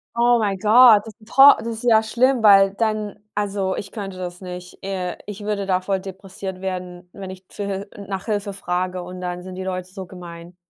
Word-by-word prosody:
Oh 240 0 +4
my 200 -3 0
god, 220 +2 +7
das 220 - -9
ist - - -39
'n - - -17
to 275 +5 +8
das 230 - -6
ist 230 +1 -5
ja 225 -3 +5
schlimm, 245 +3 +1
weil 195 -2 +7
dann 215 -2 -2 0.2
also, 200 -2 -1
ich 195 - -6
könnte 195 -3 -6
das 180 0 -6
nicht. 180 -1 -9
Äh, 185 -2 -3
ich 205 0 -7
würde 205 -2 -2
davor 190 +1 0
depressiv 190 0 -8
werden, 180 -1 -5
wenn 195 -2 -8
ich 185 0 -11
zu 205 - -6
Hil 200 +1 -4
n 200 -1 -11
nach 195 -1 -4
Hilfe 205 -2 -2
frage 180 -1 -3
und 180 +1 -9
dann 180 0 -4
sind 185 0 -8
die 190 - -5
Leute 185 -1 -4
so 190 -2 -7
gemein. 175 -1 -11
195 Hz, 220 wpm, -22 LUFS, 185-210 Hz, 0.2 s, to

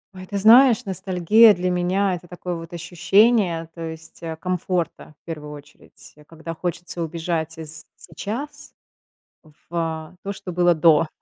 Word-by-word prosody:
Ой, 185 0 -10
ты 200 - -3
знаешь, 230 +3 +6
ностальгия 190 +3 +4
для 180 +1 -1
меня 185 +2 +1
это 175 0 -7
такое 180 0 -6
вот 165 -1 -8
ощущение, 175 +1 +2
то 165 - -10
есть, 160 +1 -9
э, 165 -1 -5
комфорта 175 -3 -3
в - - -82
первую 150 -3 -7
очередь, 145 0 -14
когда 165 0 -8
хочется 175 +1 -4
убежать 160 0 -3
из 160 0 -8
сейчас 255 - -7 1.0
в 165 0 -4
то, 200 - -4
что 190 -2 -8
было 175 0 +3
до. 160 0 +4
175 Hz, 145 wpm, -22 LUFS, 165-190 Hz, 1.0 s, знаешь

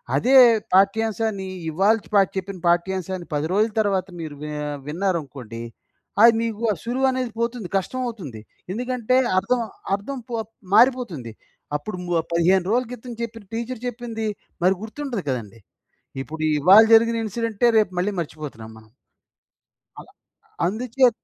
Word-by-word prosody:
అదే 250 - +3 0.4
పాఠ్యాంశాన్ని 205 +1 +2 0.2
ఇవాళ 195 +7 +3 0.2
పా 200 - +8 0.2
చెప్పిన 190 0 -4
పాఠ్యాంశాన్ని 185 +1 0
10 145 +2 -1
రోజుల 215 +3 +2
తర్వాత 195 -3 0
మీరు 155 -2 -6
వి 150 - -5 0.4
విన్నారనుకోండి, 150 - -3 0.6
అది 230 0 +9
మీకు 225 -1 -4
ఆ - - -6
సులువు 255 +3 +1
అనేది 255 -2 -2
పోతుంది 235 -5 -2
కష్టం 255 +7 -3
అవుతుంది. 160 - -7 0.3
ఎందుకంటే 250 +1 0 0.2
అర్థం, 245 +5 0 0.3
అర్థం 235 +8 -6
పో 230 - -1 0.4
మారిపోతుంది. 220 - +3 0.4
అప్పుడు 180 +6 -7
ము 175 - -5 0.2
15 175 +2 +3
రోజుల 250 +2 +2
క్రితం 245 0 -8
చెప్పిన 230 -1 -7
టీచ్చర్ 235 +1 -4
చెప్పింది, 230 -2 -5 0.4
మరి 185 +1 +5
గుర్తుండదు 235 -2 -5
కదండీ. 115 -4 -4 0.6
ఇప్పుడు 155 +2 -6 0.2
ఇవాళ 190 +9 +8
జరిగిన 230 +1 +5
ఇన్‌సిడెంటే 230 +1 0
రేపు 210 -4 +1
మళ్ళీ 185 +4 +1
మర్చిపోతున్నాం 150 -8 -7
మనం. 110 0 -17 1.1
అలా - - -13 0.6
అందుచే 245 +6 +2
205 Hz, 130 wpm, -23 LUFS, 170-235 Hz, 1.1 s, అది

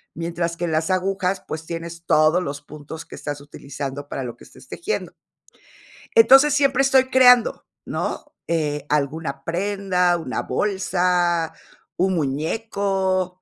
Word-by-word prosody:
Mientras 170 0 -3
que 175 - -2
en 165 - -2
las 160 +3 0
agujas, 190 0 -1
pues, 160 +1 -5
tienes 170 0 -7
todos 155 +4 +3
los 140 -1 -5
puntos 150 +2 -10
que - - -11
estás 145 -1 -5
utilizando 140 0 -7
para 135 - -4
lo 120 - -6
que - - -17
estés - - -16
tejiendo. 375 +5 -4 1.0
Entonces, 270 +6 +7
siempre 275 -2 +3
estoy 265 -1 +4
creando, 250 -2 +5 0.2
¿no?, - - -4
eh, 150 -3 -1
alguna 145 -1 -2
prenda, 180 -1 +1
una 130 -6 -3
bolsa, 175 -1 0 0.4
un 185 0 +1
muñeco. 185 +4 -1
175 Hz, 135 wpm, -22 LUFS, 155-195 Hz, 1.0 s, Entonces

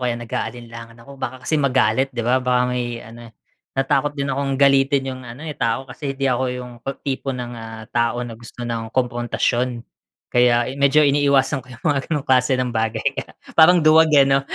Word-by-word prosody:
kaya 120 -2 -1
nag-aalinlangan 115 0 -6
ako 140 -1 -13
baka 125 0 -5
kasi 155 +3 +1
magalit, 130 -2 +2
'di 120 -4 -5
ba? 130 +2 +2
Baka 125 0 +1
ngay 120 -1 -3
ano, 115 +1 -12 0.5
natatakot 135 +2 +1
din 140 0 -2
akong 135 0 -1
galitin 140 0 +4
yung 130 - -9
ano, 125 +7 -9
eh, 155 - -4
tao 115 0 -1
kasi 135 0 -6
'di 135 - -2
ako 130 -1 +1
yung 125 0 -8
ta 135 +3 -5
tipo 135 0 -4
ng, 120 -1 -6
ah, 115 -1 -8
tao 120 +1 0
na 120 - -7
gusto 120 +2 -10
ng 115 -1 -4
kumprontasyon. 120 0 -1 0.5
Kaya 120 -1 +4
i 135 - -6
medyo 145 +2 +5
iniiwasan 140 -1 +2
ko - - -21
yung 120 +6 -15
mga 145 -2 +2
gano'ng 150 -4 -1
klase 130 0 +3
ng 125 -1 -1
bagay 110 -1 -1 0.2
kaya - - -6 0.2
parang 175 +2 +7
duwag, 160 +1 +6
eh, 140 - +7
'no. 135 0 +3
125 Hz, 200 wpm, -21 LUFS, 120-140 Hz, 0.5 s, parang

